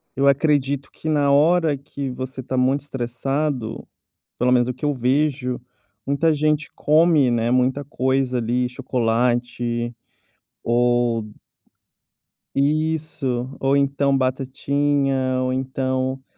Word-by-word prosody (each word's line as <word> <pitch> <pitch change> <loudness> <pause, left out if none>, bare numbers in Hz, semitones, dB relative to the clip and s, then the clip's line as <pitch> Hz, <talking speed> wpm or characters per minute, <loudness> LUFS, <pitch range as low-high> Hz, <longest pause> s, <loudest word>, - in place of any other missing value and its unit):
eu 140 +1 +2
acredito 140 -1 +2
que 160 - -9
na 145 -2 +2
hora 155 0 +3
que 140 0 -6
você 130 +1 -6
está 130 +1 -4
muito 130 +3 +2
estressado, 135 -1 -3 0.5
pelo 125 +1 +2
menos 125 0 +3
o 125 - -2
que 150 - -8
eu 145 -1 +1
vejo, 125 0 0 0.5
muita 150 +3 +2
gente 150 0 0
come, 155 -4 +4
né, 120 0 +1
muita 130 +3 +1
coisa 130 -1 0
ali, 125 +2 0
chocolate, 120 -1 -1 0.7
ou 120 -2 +1 1.3
Isso 145 -4 0
ou 135 +1 +2
então 140 0 +2
batatinha 135 0 0
ou 130 0 0
então 130 0 -2
130 Hz, 115 wpm, -22 LUFS, 125-145 Hz, 1.3 s, come